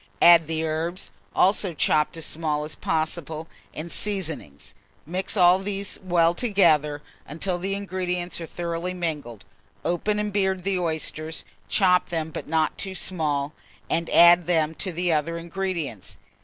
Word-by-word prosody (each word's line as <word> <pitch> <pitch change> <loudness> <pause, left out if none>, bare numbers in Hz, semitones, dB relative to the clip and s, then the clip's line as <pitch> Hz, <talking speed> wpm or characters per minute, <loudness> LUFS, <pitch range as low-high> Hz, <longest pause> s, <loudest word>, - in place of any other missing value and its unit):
Add 170 -2 +8
the 160 0 -1
herbs, 165 +3 -2 0.2
also 190 -2 +2
chopped 150 +2 +2
as 165 - -2
small 150 -2 -1
as 155 0 -5
possible, 160 0 -2 0.2
and 165 +2 -6
seasoning; 165 - -4 0.5
mix 185 +6 -2
all 180 0 +6
these 200 0 -3
well 170 -2 +3
together, 160 - +2 0.2
until 175 +4 -2
the 195 +2 -2
ingredients 180 -3 -3
are 165 - -5
thoroughly 170 +2 -4
mingled. 150 - -4 0.4
Open 205 +5 0
and 210 -1 -2
beard 190 -2 0
the 190 -1 0
oysters, 160 -1 -2 0.2
chop 180 -3 +3
them, 160 -2 -2
but - - -6
not 160 -1 0
too 190 -1 -2
small, 150 -6 0 0.4
and 165 0 0
add 175 0 +7
them 160 -3 +2
to 185 +3 -3
the 175 0 0
other 160 +2 0
ingredients. 170 - -4
170 Hz, 145 wpm, -25 LUFS, 155-185 Hz, 0.5 s, Add